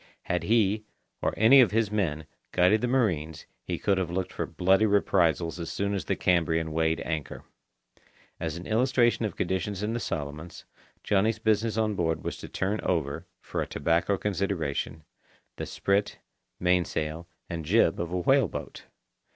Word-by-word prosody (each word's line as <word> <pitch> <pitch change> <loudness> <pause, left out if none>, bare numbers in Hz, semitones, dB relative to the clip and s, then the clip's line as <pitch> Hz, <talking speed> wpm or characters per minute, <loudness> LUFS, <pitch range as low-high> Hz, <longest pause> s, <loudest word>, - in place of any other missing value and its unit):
Had 85 -1 -2
he, 110 -1 +2 0.4
or - - +1
any 125 +5 +7
of 120 - +5
his 110 -1 +1
men, 80 -8 -1 0.3
guided 95 +4 +4
the 125 - +1
marines, 85 - 0 0.2
he - - -3
could 100 -2 +1
have 90 -3 -2
looked 90 +1 -3
for - - -3
bloody 95 +4 +3
reprisals 85 -4 +2
as 85 - -4
soon 100 0 -1
as 95 -7 -3
the - - 0
Cambrian 80 -2 +1
weighed 80 0 +1
anchor. 80 -3 -4 1.0
As 80 -1 -3
an 85 - -8
illustration 120 0 +2
of 100 - -4
conditions 95 +2 -2
in 110 +2 -1
the 120 - -1
Solomons, 75 -2 -5 0.4
Johnny's 105 +2 +2
business 110 0 +1
on 110 -1 +1
board 80 -4 -1
was - - -4
to - - -9
turn 100 +3 -1
over, 75 -6 -2
for - - -3
a - - -3
tobacco 85 +6 +1
consideration, 90 -7 -2 0.5
the - - -4
sprit, 100 +1 0 0.4
mainsail, 85 -2 0 0.2
and 85 -1 -5
jib 85 0 +3
of 85 0 -3
a 90 - -1
whale 135 +6 +3
boat. - - -8
90 Hz, 165 wpm, -27 LUFS, 80-105 Hz, 1.0 s, any